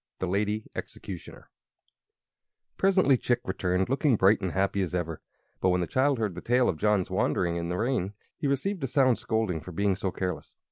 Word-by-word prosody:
The - - -2
Lady 105 +3 -1
Executioner 90 -5 -8 1.2
Presently 190 -8 +4
Chick 120 0 +1
returned, 95 0 0
looking 135 0 +2
bright 100 +1 +4
and 95 -2 -2
happy 100 +1 +1
as 90 -1 -2
ever; 85 -3 -3 0.4
but 95 - +2
when 90 0 +2
the - - 0
child 135 +7 +2
heard 110 -4 -1
the 90 - -7
tale 125 +1 +3
of 80 - -1
John's 105 -1 +1
wanderings 85 -2 +1
in 85 0 -3
the 90 - -2
rain 110 -4 0 0.2
he 150 - -2
received 150 +6 -1
a - - +1
sound 130 -2 +3
scolding 110 -8 -1
for 90 - -9
being 100 +3 +1
so 95 0 -2
careless. 90 0 -4
100 Hz, 190 wpm, -28 LUFS, 90-125 Hz, 1.2 s, Presently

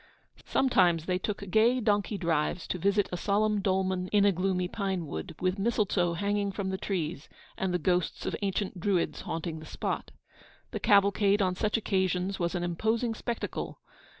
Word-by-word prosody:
Sometimes 180 -11 +3
they 180 0 0
took 200 +1 -4
gay 235 +5 +4
donkey 210 -2 +1
drives 165 -1 0
to 180 - -2
visit 200 +3 +2
a 180 - -2
solemn 210 +2 +1
dolmen 190 -1 0
in 205 +1 +3
a 200 - +6
gloomy 185 0 0
pine 190 -3 -2
wood, 80 - -6
with 185 +2 0
mistletoe 195 -5 +1
hanging 200 +2 0
from 195 -1 -3
the 190 - -2
trees, 165 -6 -3 0.3
and 190 -1 -1
the 180 - +2
ghosts 180 +1 0
of - - -1
ancient 195 -1 -2
Druids 185 -1 0
haunting 165 -1 -4
the 155 - -10
spot. - - -3 0.6
The - - -3
cavalcade 200 0 +4
on 185 -1 +1
such 210 +4 0
occasions 190 -2 0
was 170 +1 -1
an 175 - -1
imposing 220 +7 0
spectacle. 235 - -4
190 Hz, 170 wpm, -29 LUFS, 180-205 Hz, 0.6 s, a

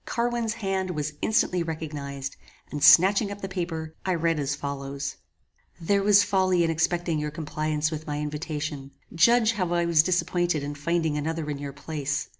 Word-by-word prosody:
Carwin's 235 -1 -1
hand 195 -3 -2
was 150 -3 -3
instantly 185 -4 +2
recognized, 145 -4 -5 0.4
and 145 -1 -4
snatching 190 +8 +7
up 205 0 -7
the 195 - -3
paper, 170 -4 -4
I 185 -1 0
read 165 -1 +1
as 140 -1 -1
follows: 140 -1 -5 0.6
"There 200 +4 +1
was 200 0 +6
folly 185 -2 +2
in 165 - +1
expecting 165 0 0
your 150 0 -2
compliance 155 0 -2
with 155 0 -6
my 145 -1 -2
invitation. 150 -1 -4 0.2
Judge 225 +7 +5
how 185 -5 -2
I 170 0 +2
was 170 -2 +5
disappointed 175 -2 0
in 145 +1 -4
finding 160 +1 -1
another 160 0 -3
in 140 - -5
your 140 -1 -5
place. 145 0 -3
160 Hz, 170 wpm, -26 LUFS, 150-185 Hz, 0.6 s, snatching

